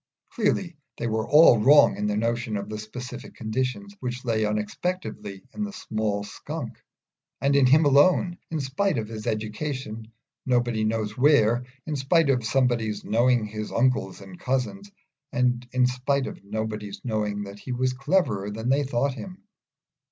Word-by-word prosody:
Clearly 190 - 0 0.2
they - - -3
were 110 -1 -1
all 150 -6 +7
wrong 145 +6 +6
in 105 - -2
their 105 0 0
notion 115 0 -1
of 100 +1 -5
the 105 0 -5
specific 125 +4 -8
conditions, 110 -3 -3
which 125 0 -5
lay 110 -2 +1
unexpectedly 105 - -4
in 215 - -3
the 205 - -4
small 110 - -2
Skunk, 100 - -7 0.6
and 140 +2 +2
in 140 -2 +5
him 150 +4 +5
alone 175 +5 +4
in 160 - -2
spite 155 +5 0
of 110 -2 -2
his 110 0 -7
education 110 +1 -4 0.3
nobody 120 -3 +1
knows 110 -1 -1
where, 125 -3 +3 0.2
in 155 - -3
spite 140 +2 +3
of 125 -3 0
somebody's 120 -3 0
knowing 120 0 +3
his 105 0 -6
uncles 120 -6 0
and 95 -2 -12
cousins, 165 +11 -2 0.4
and 125 -1 0
in 125 0 +3
spite 130 +2 0
of - - -8
nobody's 105 0 -5
knowing 105 -3 -1
that 100 0 -9
he 130 - -7
was 130 +1 0
cleverer 125 - 0
than 110 +4 -4
they 140 +2 +3
thought 135 +1 0
him. 185 +7 -9
120 Hz, 160 wpm, -25 LUFS, 110-135 Hz, 0.6 s, all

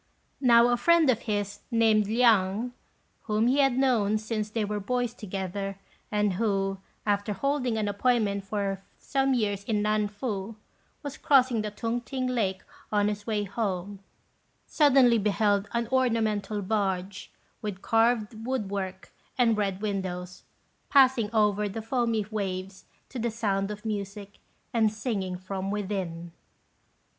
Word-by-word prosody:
Now 235 -2 +6
a 240 - +2
friend 335 -1 +5
of 230 - -1
his, 205 -1 -2
named 220 -3 +3
Liang, 225 0 +3 0.5
whom 215 +1 +1
he 260 +4 +3
had 270 -3 +3
known 230 -6 +2
since 215 -1 -3
they 215 0 -1
were 210 0 -2
boys 245 +3 -1
together, 195 -2 -4 0.3
and 210 -2 +1
who, 195 -1 0 0.3
after 205 0 0
holding 260 -1 0
an 215 -1 0
appointment 205 -1 +1
for 195 -1 -2 0.2
some 270 -1 0
years 205 -4 -1
in 210 -1 0
Nan 215 0 +1
fu, 205 0 -4 0.5
was 285 -1 -6
crossing 260 -6 +4
the 210 - -3
Tung 230 +3 -3
t'ing 255 +2 -3
Lake, 210 -7 -1 0.3
on 205 -1 +2
his 205 +1 -5
way 210 -2 0
home, 200 -1 -3 0.7
suddenly 265 -6 +5
beheld 205 0 +1
an 235 -1 -1
ornamental 220 -5 0
barge, 195 -2 -2 0.3
with 205 -3 -5
carved 225 -1 +1
wood 235 -5 -2
work 190 -1 -5 0.3
and 235 -3 +4
red 200 -2 -1
windows, 185 -3 -3 0.5
passing 260 -6 +5
over 210 -2 +2
the 200 - -5
foamy 230 -3 0
waves 190 -2 -4 0.2
to 255 - -6
the 235 +1 0
sound 200 -3 -1
of 210 +2 -7
music 205 -1 -5 0.3
and 220 -2 +3
singing 205 -5 -3
from 190 +1 -4
within. 190 -5 -3
210 Hz, 140 wpm, -27 LUFS, 200-235 Hz, 0.7 s, Now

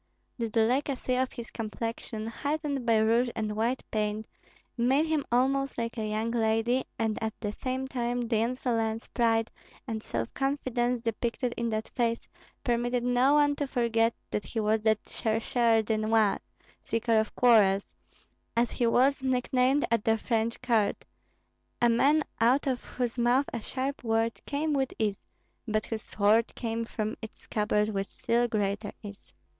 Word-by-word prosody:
The 230 -1 -1
delicacy 250 +4 +1
of 260 0 0
his 235 -1 -8
complexion, 225 0 -4
heightened 285 +2 -2
by 225 -1 +5
rouge 230 +3 +3
and 215 -1 -2
white 235 +4 0
paint, 215 0 -1 0.5
made 260 +6 +3
him 315 -3 0
almost 270 +2 +1
like 230 -1 -2
a 215 -2 -3
young 220 +2 -1
lady; 230 +2 +1
and 225 -1 -1
at 220 -1 -3
the 210 -2 -2
same 260 +2 -3
time 245 -2 -1
the 230 -1 0
insolence, 230 -1 -1
pride, 225 -1 +1 0.4
and 220 -1 -3
self 115 - -4
confidence 255 -3 0
depicted 235 +2 -2
in 235 0 -1
that 220 0 -2
face 230 -2 -1 0.4
permitted 240 0 0
no 250 +3 +3
one 290 -1 +4
to 285 - -1
forget 230 -3 +1 0.2
that 210 - -1
he 225 - -4
was 215 0 +2
that 220 -1 +1
chercheur 225 0 +1
de 215 0 0
noises 215 -1 +2 0.4
(seeker 230 0 +1
of 220 - -2
quarrels), 205 -5 +4 0.6
as 235 0 +2
he 240 - +1
was 260 +4 +3
nicknamed 260 +1 +2
at 230 -2 +2
the 225 0 +3
French 225 +1 -1
court, 230 -5 +1 0.7
a 240 - +4
man 285 +6 +4 0.2
out 245 +5 +3
of 260 -3 -1
whose 245 -1 -3
mouth 245 +4 +3
a 235 - -2
sharp 265 +5 -4
word 225 0 0
came 300 +2 -1
with 270 -2 0
ease, 210 -3 -2 0.4
but 215 0 0
whose 225 -1 -4
sword 215 +3 +2
came 230 -1 -2
from 215 -1 -3
its 220 - -9
scabbard 210 0 0
with 195 -2 -2
still 240 +1 0
greater 205 -1 -1
ease. 205 -1 -10
230 Hz, 160 wpm, -29 LUFS, 220-250 Hz, 0.7 s, by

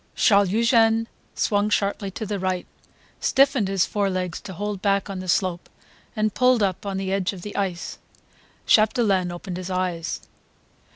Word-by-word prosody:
Charles 200 -3 +4
Eugene 225 +1 +3 0.3
swung 205 0 +1
sharply 200 -1 0
to 215 +3 -6
the 205 -1 -3
right, 185 -1 -1 0.5
stiffened 275 -5 +3
his 195 -2 +2
forelegs 185 -4 -2
to 190 - -8
hold 205 +1 -4
back 200 0 +1
on 190 - -5
the 185 - -7
slope 180 -1 0 0.5
and 215 -1 0
pulled 250 -3 +3
up 195 +1 -1
on 195 -1 -2
the 190 0 -2
edge 195 0 0
of 180 -3 -10
the 210 - -7
ice. 185 -4 -3 0.7
Chapdelaine 215 -5 +3
opened 175 +1 -6
his 185 0 -6
eyes. 180 -3 -2
195 Hz, 160 wpm, -24 LUFS, 185-215 Hz, 0.7 s, Charles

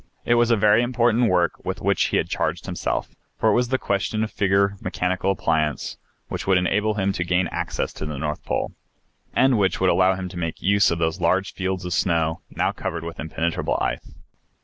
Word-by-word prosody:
It 120 - +3
was 120 0 +3
a 115 - +5
very 105 +2 +5
important 120 -1 +2
work 85 -2 +1
with - - -3
which - - +2
he - - +1
had - - 0
charged - - -2
himself, - - -3 0.3
for 110 - +3
it - - +4
was 120 +2 +2
the 130 +2 +1
question 105 0 -1
of 110 - -3
figure 100 0 +2
mechanical 90 +1 -1
appliance 80 -5 0 0.3
which - - -5
would 95 -1 +5
enable 105 +4 +1
him 100 -1 0
to 85 - -1
gain 90 +1 +1
access - - -3
to 75 - -5
the 75 -2 -5
North 75 +1 -3
Pole, - - -2 0.6
and 130 -4 +4
which 95 -2 +1
would 95 -1 +3
allow 95 0 +3
him 95 0 -5
to 90 - -9
make 85 -2 -3
use 100 +1 +3
of 85 - 0
those 80 -1 -1
large 95 +1 +1
fields 95 -1 -3
of 90 - -2
snow 85 -1 +1
now 95 +3 0
covered 90 -4 -4
with 85 0 -7
impenetrable 80 +1 -1
ice. - - -3
95 Hz, 210 wpm, -23 LUFS, 85-105 Hz, 0.6 s, a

